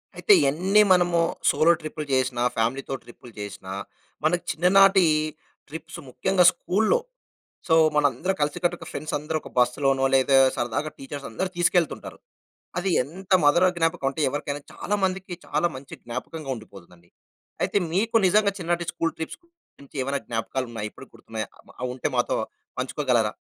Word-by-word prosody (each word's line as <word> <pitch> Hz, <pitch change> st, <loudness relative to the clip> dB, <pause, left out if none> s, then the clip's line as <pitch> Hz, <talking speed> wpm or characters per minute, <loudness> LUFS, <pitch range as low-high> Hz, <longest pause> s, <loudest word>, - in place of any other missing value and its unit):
అయితే 420 Hz, -, +4 dB, 0.2 s
ఎన్ని 185 Hz, +8 st, +3 dB
మనము 175 Hz, -2 st, +4 dB, 0.3 s
సోలో 165 Hz, +2 st, +4 dB
ట్రిప్‌లు 155 Hz, 0 st, -5 dB
చేసినా 130 Hz, -2 st, +1 dB
ఫ్యామిలీతో 125 Hz, +4 st, -1 dB
ట్రిప్‌లు 120 Hz, 0 st, -14 dB
చేసినా 95 Hz, -2 st, -7 dB, 0.5 s
మనకు 175 Hz, +3 st, +1 dB
చిన్ననాటీ 190 Hz, +2 st, +5 dB, 0.6 s
ట్రిప్స్ 160 Hz, +2 st, -8 dB
ముఖ్యంగా 185 Hz, +7 st, +2 dB
స్కూల్లో. 220 Hz, -, +1 dB, 0.7 s
సో 160 Hz, -, +5 dB, 0.2 s
మన 150 Hz, -, +3 dB
అందరం 190 Hz, +3 st, -2 dB
కలిసికట్టుగా 175 Hz, +4 st, -1 dB
ఫ్రెండ్స్ 155 Hz, -, -5 dB
అందరూ 150 Hz, +2 st, -3 dB
ఒక -, -, -11 dB
బస్లోనో 135 Hz, +2 st, +2 dB
లేదా 135 Hz, +1 st, +4 dB, 0.2 s
సరదాగా 130 Hz, +6 st, -2 dB
టీచర్స్ 140 Hz, +1 st, -7 dB
అందరూ 185 Hz, +12 st, -2 dB
తీసుకెళ్తుంటారు. 175 Hz, -1 st, 0 dB, 0.6 s
అది 190 Hz, +2 st, 0 dB
ఎంత 185 Hz, +7 st, -8 dB
మదుర 160 Hz, +5 st, +5 dB
జ్ఞాపకమంటే 160 Hz, -4 st, 0 dB
ఎవరికైనా 145 Hz, +1 st, -4 dB
చాలా 205 Hz, -, -3 dB
మందికి 190 Hz, 0 st, -2 dB
చాలా 150 Hz, +4 st, +1 dB
మంచి 135 Hz, +1 st, -10 dB
జ్ఞాపకంగా 135 Hz, +5 st, -6 dB
ఉండిపోతుందండి. 90 Hz, -5 st, -15 dB, 0.5 s
అయితే -, -, +2 dB
మీకు 220 Hz, +6 st, +1 dB
నిజంగా 200 Hz, +2 st, +3 dB
చిన్ననాటి 175 Hz, -1 st, -1 dB
స్కూల్ 165 Hz, -1 st, -1 dB
ట్రిప్స్ 160 Hz, -, -6 dB
గురించి 340 Hz, -, -19 dB
ఏమైనా 140 Hz, +1 st, -2 dB
జ్ఞాపకాలు 120 Hz, +3 st, -3 dB
ఉన్నాయా? 105 Hz, -2 st, -4 dB
ఇప్పటికి -, -, -14 dB
గుర్తున్నాయా? 110 Hz, -1 st, -6 dB, 0.3 s
అవి 125 Hz, 0 st, -2 dB
ఉంటే 130 Hz, -, -2 dB
మాతో -, -, +1 dB, 0.4 s
పంచుకోగలరా? 125 Hz, -4 st, 0 dB
150 Hz, 140 wpm, -25 LUFS, 130-175 Hz, 0.7 s, చిన్ననాటీ